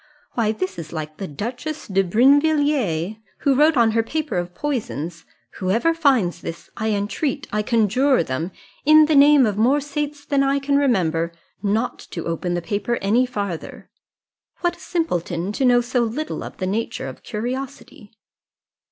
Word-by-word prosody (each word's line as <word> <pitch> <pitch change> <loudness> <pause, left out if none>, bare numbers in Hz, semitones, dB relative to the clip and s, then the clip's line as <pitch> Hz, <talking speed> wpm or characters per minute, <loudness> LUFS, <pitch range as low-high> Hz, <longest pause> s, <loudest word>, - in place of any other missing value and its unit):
Why, 225 -3 +1
this 185 -4 -4
is 155 -2 -8
like 155 -1 -6
the 195 - -5
Duchess 245 - -5
de 195 -1 +2
Brinvilliers, 255 - +2 0.2
who 280 - +3
wrote 300 +2 +4
on 230 -2 +4
her 225 +1 +2
paper 305 +6 -3
of 175 0 -3
poisons, 175 - -4 0.3
'Whoever 225 - +1
finds 255 - +2
this, 165 - -8
I 220 -1 -2
entreat, 210 +7 -1
I 210 - +1
conjure 235 +2 +2
them, 160 +6 -3 0.3
in 310 +1 +7
the 310 - +1
name 285 -1 +7
of 205 -2 -1
more 260 +6 +4
saints 290 0 -4
than 280 -1 +1
I 275 0 +2
can 280 0 0
remember, 175 - +1 0.3
not 215 +4 0
to 165 - -5
open 170 +1 -2
the 175 - -3
paper 210 +7 -1
any 230 +6 +2
farther.' 200 -8 -5 0.7
What 345 -1 +1
a - - -21
simpleton, 180 - -2
to 265 +5 0
know 245 -1 +5
so 245 +1 -1
little 245 +7 -2
of - - -9
the 185 - -3
nature 210 -4 -2
of 130 - -9
curiosity!" 250 -1 -6
230 Hz, 165 wpm, -22 LUFS, 185-280 Hz, 0.7 s, in